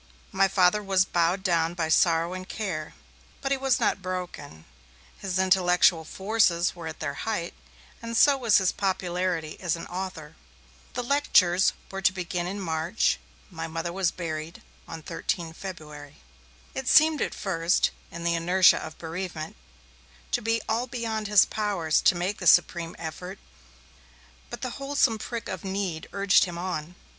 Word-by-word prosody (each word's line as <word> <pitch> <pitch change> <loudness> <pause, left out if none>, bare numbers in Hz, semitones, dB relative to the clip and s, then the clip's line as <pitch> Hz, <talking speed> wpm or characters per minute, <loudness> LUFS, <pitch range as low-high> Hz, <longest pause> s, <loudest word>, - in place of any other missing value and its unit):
My 195 0 +3
Father 190 +2 +3
was 190 -2 +2
bowed 175 +2 +1
down 170 -2 +1
by 165 -2 -1
sorrow 165 +2 +3
and 185 0 -7
care, 170 -8 -4 0.4
but 275 - -3
he 275 - +2
was 265 -2 +2
not - - +1
broken. 180 - -6 0.5
His 190 -2 -3
intellectual 180 -3 +3
forces 190 -2 +1
were 170 -2 -7
at 160 - -7
their 150 -2 -3 0.2
height, 175 -6 -2 0.5
and 230 0 -3
so 285 +3 +6
was 235 -6 +3
his 190 -2 +2
popularity 180 -4 -2
as 175 -3 0
an 165 - -7
author. 175 -4 -6 0.6
The 245 - -3
lectures 195 -9 +3 0.2
were 195 0 -5
to 185 - +4
begin 180 -1 -3
in 200 +3 -4
march; 165 +2 0 0.3
my 165 -1 -5
Mother 165 +1 -4
was 190 -2 +1
buried 160 -1 -6 0.2
on 160 -1 -8
13 165 0 -3
February. 150 -6 -9 0.6
It 265 -1 -5
seemed 310 +1 +5
at - - -2
first, 170 -2 +1 0.2
in 170 0 -8
the 170 0 +1
inertia 175 +2 +4
of 155 - -8
bereavement, 165 -1 -6 0.8
to - - +1
be 225 0 0
all 235 +3 0
beyond 225 -3 -3
his 205 -2 +6
powers 195 -7 0
to - - +4
make 180 +4 -2
the 180 - -2
supreme 170 -1 +4
effort, 180 +4 -7 1.1
but - - -7
the 255 - -3
wholesome 275 -5 +1
prick 230 +1 -5
of - - -5
need 190 -4 -3
urged 200 -2 +4
him 175 -2 -7
on. 175 -2 -4
180 Hz, 160 wpm, -26 LUFS, 165-200 Hz, 1.1 s, so